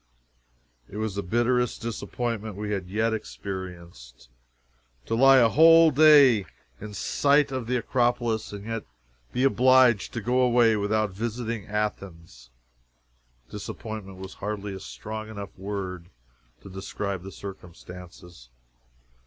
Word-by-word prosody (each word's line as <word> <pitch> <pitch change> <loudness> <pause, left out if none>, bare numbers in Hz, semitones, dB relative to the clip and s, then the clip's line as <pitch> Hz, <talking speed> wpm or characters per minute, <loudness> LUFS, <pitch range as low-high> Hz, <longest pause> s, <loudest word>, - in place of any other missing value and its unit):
It 105 - -9
was 110 -2 -2
the 100 - -3
bitterest 120 +5 0
disappointment 115 -2 -4
we 105 +1 -5
had 95 -3 -3
yet 110 +3 0
experienced. 85 - -8 0.8
To - - -4
lie 135 +3 +6
a 120 -3 +6
whole 165 +4 +7
day 140 - +6 0.3
in 105 0 -8
sight 145 +6 +2
of 130 -3 -4
the 125 +1 0
Acropolis, 120 -2 0
and 100 0 -8
yet 115 -1 -4 0.5
be 125 - -1
obliged 130 -4 +4
to - - -3
go 125 +4 +1
away 120 -2 +4
without 105 0 0
visiting 115 +1 -4
Athens! 90 - -5 1.0
Disappointment 105 -1 -7
was 95 0 -9
hardly 105 -1 -5
a 95 - -7
strong 110 +3 -7
enough 100 -2 -8
word 95 -3 -6 0.5
to - - -10
describe 95 0 -5
the 95 +2 -9
circumstances. 90 -6 -11
105 Hz, 125 wpm, -26 LUFS, 95-120 Hz, 1.0 s, whole